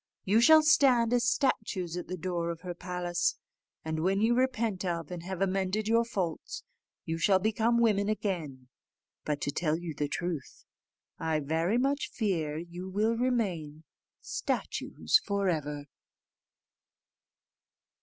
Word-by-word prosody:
You 210 +4 +4
shall 315 +5 +7
stand 255 -6 +4
as 240 -1 +3
statues 205 - -1
at 180 - -5
the 185 - -4
door 170 -1 -2
of 170 -1 -5
her 180 -1 -5
palace, 175 -1 -2 0.5
and 160 0 -2
when 190 +4 +1
you 225 +3 +3
repent 235 -6 0
of 170 -3 -3
and 175 -1 -5
have 190 +1 -6
amended 195 +2 0
your 230 +1 +4
faults, 180 -8 -4 0.4
you 165 0 -3
shall 190 +2 +4
become 220 +4 +1
women 210 -3 +2
again. 165 -12 -3 0.6
But, 150 -1 -2
to 145 - -1
tell 155 0 0
you 170 -2 -5
the 145 0 -2
truth, 170 -5 -4 0.5
I 160 -1 0
very 160 +8 0
much 275 +3 0
fear 165 -9 -1
you 175 +3 -7
will 215 +4 +1
remain 190 -12 -1 0.4
statues 440 - 0
for 200 -1 0
ever." 150 -3 -2
185 Hz, 140 wpm, -30 LUFS, 165-225 Hz, 0.6 s, shall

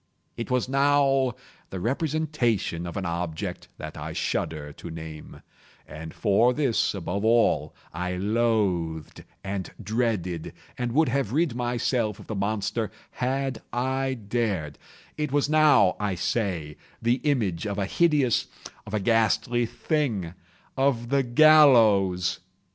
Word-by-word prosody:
It 115 - -5
was 125 -2 +1
now 135 -1 +3 0.3
the 95 - -5
representation 125 - -1
of 85 - -6
an 95 - -3
object 85 -1 -4
that - - -7
I - - -6
shudder 75 -2 -3
to 85 - -9
name—and 80 0 -11
for 115 +4 +3
this, 135 -8 +1
above 100 +2 -3
all, 115 +1 +2 0.2
I 90 +2 -3
loathed, 95 -6 0 0.2
and 95 -1 -4
dreaded, 105 -6 -2 0.2
and 125 -1 -3
would 155 +1 +3
have 130 -3 -1
rid 160 -2 +1
myself 120 -3 -1
of - - -12
the - - -5
monster 105 +2 -1 0.2
had 130 -1 -2
I 130 +2 -1
dared—it 110 - -4
was 145 0 +2
now, 155 -11 +5
I 100 -2 -1
say, 85 -5 -2 0.2
the 120 +2 +2
image 110 - 0
of 100 -1 -3
a 100 - 0
hideous—of 135 - 0
a - - +1
ghastly 115 +3 +2
thing—of 115 - -2
the 140 0 +3
GALLOWS! 120 - +5
115 Hz, 120 wpm, -26 LUFS, 95-130 Hz, 0.3 s, now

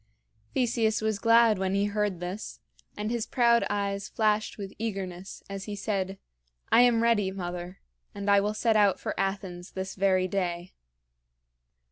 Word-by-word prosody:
Theseus 230 -3 +1
was 220 -1 -1
glad 230 -2 +5
when 190 0 0
he 200 +1 +2
heard 205 -3 -1
this, 180 +4 -6 0.4
and 210 +2 -2
his 235 -2 -2
proud 235 -2 +3
eyes 200 -1 -2
flashed 215 +1 0
with 200 -2 -7
eagerness 195 -4 -5
as 195 0 -6
he 210 - -5
said: 195 -2 -2 0.5
"I 235 - +7
am 235 -2 +4
ready, 220 -4 +3
mother; 180 -1 -6 0.3
and 200 0 -5
I 200 0 +6
will 210 +1 -1
set 225 0 +2
out 205 -3 +4
for - - -3
Athens 195 -2 -3
this 190 0 -4
very 185 -1 +2
day." 175 -2 -3
200 Hz, 155 wpm, -28 LUFS, 190-220 Hz, 0.5 s, I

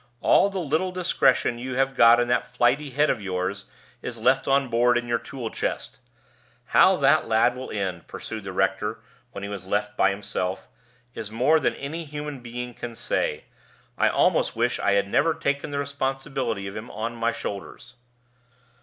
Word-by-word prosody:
"All 200 - +4
the 195 - -5
little 170 +2 0
discretion 135 -9 +2
you 130 +1 -4
have 135 +1 +1
got 115 0 +7
in 120 - +1
that 125 0 +1
flighty 125 +4 +1
head 145 +4 +2
of - - -3
yours 95 +1 -3 0.4
is 120 - -5
left 130 +4 +2
on 135 0 +3
board 120 +1 +3
in 120 0 -3
your 120 0 +1
tool 125 -5 -6
chest. - - -4 0.7
How - - +6
that - - +3
lad 110 +2 +3
will 130 +1 -7
end," 95 -5 -4
pursued - - -7
the - - -6
rector, - - -1 0.3
when 100 - -7
he - - -3
was 100 -2 -7
left 105 +1 -1
by 95 - +4
himself, 100 -2 -3 0.5
"is 105 - -6
more 130 +9 +3
than 140 - 0
any 155 +5 -5
human 150 -2 -6
being 120 0 -6
can 120 0 -7
say. - - -1 0.5
I - - +3
almost - - +2
wish 120 +2 0
I 100 - +2
had 100 0 +2
never 155 +10 +2
taken 140 -3 -1
the 145 - -3
responsibility 135 -6 -2
of 100 +1 -6
him 110 +2 -7
on 115 +2 -4
my 115 0 0
shoulders." 115 +4 -7
120 Hz, 180 wpm, -25 LUFS, 110-140 Hz, 0.7 s, got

